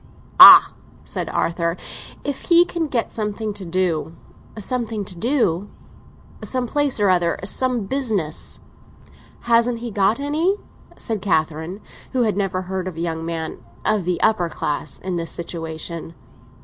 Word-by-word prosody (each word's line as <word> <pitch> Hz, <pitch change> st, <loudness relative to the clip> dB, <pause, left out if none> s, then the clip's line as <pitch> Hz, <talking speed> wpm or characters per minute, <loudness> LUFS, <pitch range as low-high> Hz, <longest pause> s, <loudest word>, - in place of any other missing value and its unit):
"Ah," -, -, +11 dB, 0.3 s
said -, -, -4 dB
Arthur, 170 Hz, 0 st, -1 dB, 0.5 s
"if 285 Hz, -2 st, -4 dB
he 345 Hz, 0 st, +6 dB
can 340 Hz, -3 st, -3 dB
get 245 Hz, -5 st, -1 dB
something 215 Hz, 0 st, -3 dB
to 200 Hz, -1 st, -8 dB
do." 170 Hz, -2 st, -1 dB, 0.4 s
"Something 220 Hz, -1 st, -3 dB
to 185 Hz, -, -6 dB
do?" 205 Hz, -, 0 dB, 0.7 s
"Some 255 Hz, -1 st, -1 dB
place 285 Hz, 0 st, +2 dB
or 200 Hz, -2 st, +4 dB
other; 175 Hz, -2 st, +1 dB
some 245 Hz, +3 st, +1 dB
business." 215 Hz, -, -1 dB, 0.8 s
"Hasn't 235 Hz, 0 st, +2 dB
he 235 Hz, 0 st, -6 dB
got 205 Hz, +4 st, +2 dB
any?" 310 Hz, +7 st, +1 dB, 0.4 s
said 220 Hz, -4 st, -3 dB
Catherine, 160 Hz, +1 st, -1 dB, 0.3 s
who 255 Hz, -2 st, +2 dB
had 215 Hz, -4 st, 0 dB
never 195 Hz, -2 st, -1 dB
heard 185 Hz, 0 st, -4 dB
of 180 Hz, -3 st, -7 dB
a -, -, -5 dB
young 165 Hz, -1 st, -3 dB
man—of 165 Hz, -, -3 dB
the 180 Hz, -1 st, -1 dB
upper 195 Hz, -6 st, +2 dB
class—in 175 Hz, +4 st, -3 dB
this 165 Hz, -1 st, -3 dB
situation. 165 Hz, 0 st, -5 dB
195 Hz, 135 wpm, -21 LUFS, 170-235 Hz, 0.8 s, Ah